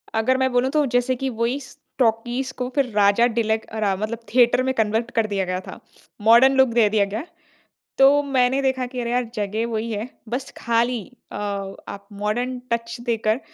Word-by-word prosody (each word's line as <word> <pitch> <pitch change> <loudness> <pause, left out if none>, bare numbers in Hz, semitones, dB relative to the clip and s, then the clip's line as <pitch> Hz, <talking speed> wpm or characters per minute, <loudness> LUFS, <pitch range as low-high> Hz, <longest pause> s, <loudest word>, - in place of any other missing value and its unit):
अगर 255 +4 +2
मैं 260 -1 +1
बोलूँ 250 +2 +2
तो 300 -2 +2
जैसे 250 +1 +2
कि 265 +1 -3
वही 245 +4 0
स 265 - -13 0.2
टॉकीज़ 240 +3 0
को 250 0 -2
फिर 275 -3 +1
राजा 205 +3 +4
डीलक 220 -1 -1
अरा 200 -3 +1
मतलब 215 +3 -4
थिएटर 245 0 +4
में 260 0 0
कन्वर्ट 225 +1 0
कर 225 -1 +2
दिया 195 -2 -1
गया 185 0 -2
था, - - -10 0.4
मॉडर्न 235 +5 +6
लूक 265 -1 +6
दे 230 -3 +4
दिया 205 -1 +2
गया। 210 +8 -4 0.7
तो 275 +2 +6
मैंने 265 -1 +1
देखा 260 -1 0
कि 250 0 -6
अरे 235 0 -3
यार 250 0 +1
जगह 215 +2 -2
वही 225 0 -3
है 215 +3 -3 0.2
बस 250 +3 -4
खाली 235 0 0 0.3
अ - - -6 0.5
आप 200 0 -9
मॉडर्न 245 +4 -1
टच 230 0 -2
देकर 225 0 0
235 Hz, 190 wpm, -22 LUFS, 220-255 Hz, 0.7 s, मॉडर्न